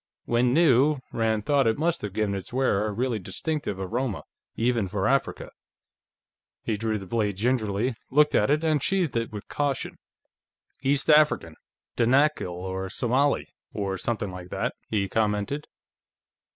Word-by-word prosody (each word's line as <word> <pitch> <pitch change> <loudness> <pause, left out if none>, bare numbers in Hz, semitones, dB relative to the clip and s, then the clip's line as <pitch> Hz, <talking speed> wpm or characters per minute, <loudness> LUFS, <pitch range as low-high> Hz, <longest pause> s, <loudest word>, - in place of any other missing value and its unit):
When 120 +1 +2
new, 145 -1 +4 0.2
Rand 110 -2 0
thought, 140 -4 +3
it 110 - +2
must 165 +3 0
have 105 - -4
given 105 -1 0
its 95 -2 -5
wearer 120 -5 +1
a - - -2
really 120 +1 -1
distinctive 145 - -3
aroma, 110 +3 -2 0.3
even 115 -3 +1
for 95 +1 -1
Africa. 135 0 0 1.1
He 110 - -1
drew 110 +1 -1
the 95 - -8
blade 105 0 -1
gingerly, 115 0 0 0.2
looked 150 +2 +4
at - - +3
it, 150 +2 +2
and 155 -3 +2
sheathed 180 -4 +1
it 115 0 -1
with 105 -2 -8
caution. 145 -3 -2 0.8
"East 140 +1 +1
African; 150 - +4 0.4
Danakil, 135 +3 +3
or 95 +2 -4
Somali, 130 +7 +1 0.3
or 100 -2 -2
something 100 0 -2
like 90 -1 -9
that," - - -2 0.2
he 100 -3 0
commented. 105 +7 -1
115 Hz, 150 wpm, -26 LUFS, 100-140 Hz, 1.1 s, new